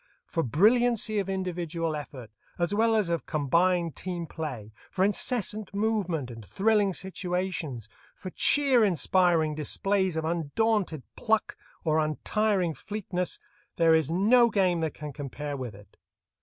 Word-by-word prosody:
For 165 - -2
brilliancy 215 - +3
of 195 -1 -3
individual 175 -4 -2
effort 130 -6 -8 0.3
as 175 +2 0
well 225 +2 +3
as 210 -4 +2
of 170 -1 -2
combined 170 +3 +1
team 175 -2 -4
play, 130 -11 -6 0.2
for 190 0 +1
incessant 210 -1 -1
movement 195 - -1
and 115 -1 -10
thrilling 205 - +1
situations, 180 - -3 0.3
for 185 - -8
cheer 270 -1 +5
inspiring 175 -4 +2
displays 190 +4 0
of 160 0 -2
undaunted 170 - 0
pluck 220 -2 0 0.3
or 155 -1 +2
untiring 180 +4 0
fleetness, 185 -2 -4 0.4
there 165 -1 +4
is 160 -3 +2
no 225 +8 +4
game 185 -5 +1
that 160 -2 -2
can 150 -1 -7
compare 145 +1 -5
with 125 -6 -6
it. 100 -1 -17
175 Hz, 135 wpm, -27 LUFS, 155-205 Hz, 0.4 s, cheer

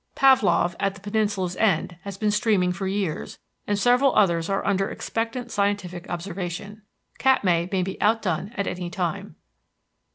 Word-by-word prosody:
Pavlof, 220 - +4
at 195 -1 0
the - - -12
peninsula's 205 -3 -1
end, 180 -4 +1
has 200 -1 -6
been 210 0 +1
steaming 205 -4 +2
for 190 +2 -3
years, 190 -5 -3 0.3
and 205 - +1
several 250 +5 +3
others 170 -4 +3
are 195 0 -1
under 195 -1 +1
expectant 230 +2 -4
scientific 200 -4 -1
observation. 185 +3 -5 0.4
Katmai 180 -10 +3
may 190 -2 +1
be 190 +1 -5
outdone 210 -4 +1
at 200 - 0
any 180 -1 -4
time. 175 -3 -3
195 Hz, 150 wpm, -24 LUFS, 180-210 Hz, 0.4 s, Pavlof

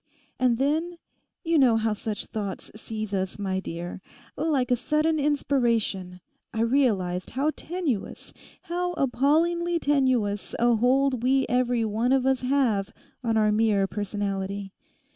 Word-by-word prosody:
And 250 -2 +3
then—you 325 +3 -2
know 245 -4 +5
how 220 -1 +1
such 210 0 -4
thoughts 200 -4 -5
seize 215 -1 -6
us, 190 -1 -2
my 190 -2 -2
dear—like 200 - -4
a - - +5
sudden 305 +5 +1
inspiration, 235 -10 0 0.3
I 225 - -2
realised 210 -8 +1
how 295 +3 +2
tenuous, 325 - -4 0.3
how 355 +1 -2
appallingly 335 +5 +1
tenuous 260 -9 +1
a 240 0 +3
hold 255 +2 +2
we 265 +2 +2
every 245 -1 +1
one 225 +4 +1
of 265 -1 +2
us 265 -1 +2
have 250 -7 +1 0.3
on 225 -2 +1
our 215 -1 +3
mere 210 -2 +2
personality. 200 -1 -3
240 Hz, 125 wpm, -26 LUFS, 205-275 Hz, 0.3 s, know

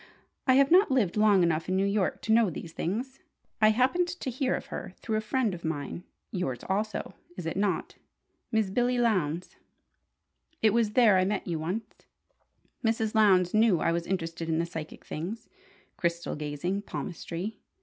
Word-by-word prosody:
"I 260 - +6
have 275 +2 +4
not 370 +2 +6
lived 245 -10 +2
long 210 -3 +5
enough 165 0 0
in 185 - +1
New 195 +1 +2
York 200 -1 0
to 220 - -1
know 225 -2 +5
these 165 0 -7
things. 245 +12 -3 0.4
I 215 - +7
happened 260 +11 +2
to 345 -7 -4
hear 260 +1 0
of - - -5
her - - -6
through 220 -1 -2
a - - 0
friend 220 -1 0
of 170 - -8
mine 160 +3 -4 0.3
(yours 135 - -2
also, 210 +2 -2 0.2
is 180 - -5
it 165 - -2
not?) 200 0 -1 0.5
Mrs. 220 -4 +1
Billee 245 +2 +2
Lowndes. 185 -8 0 1.0
It 220 - +4
was 225 -2 +2
there 215 -6 +6
I - - +3
met 195 +1 -1
you 165 -3 -2
once. 180 +8 -2 1.0
Mrs. 225 -1 +1
Lowndes 190 -5 +4
knew 215 -5 +4
I - - +1
was 170 0 -2
interested 165 -3 -3
in 160 - +1
the 165 - +1
psychic 160 -2 -8
things: 205 +9 -5 0.5
crystal 170 0 -1
gazing, 150 +6 -3
palmistry. 195 +1 -5
200 Hz, 175 wpm, -28 LUFS, 170-225 Hz, 1.0 s, I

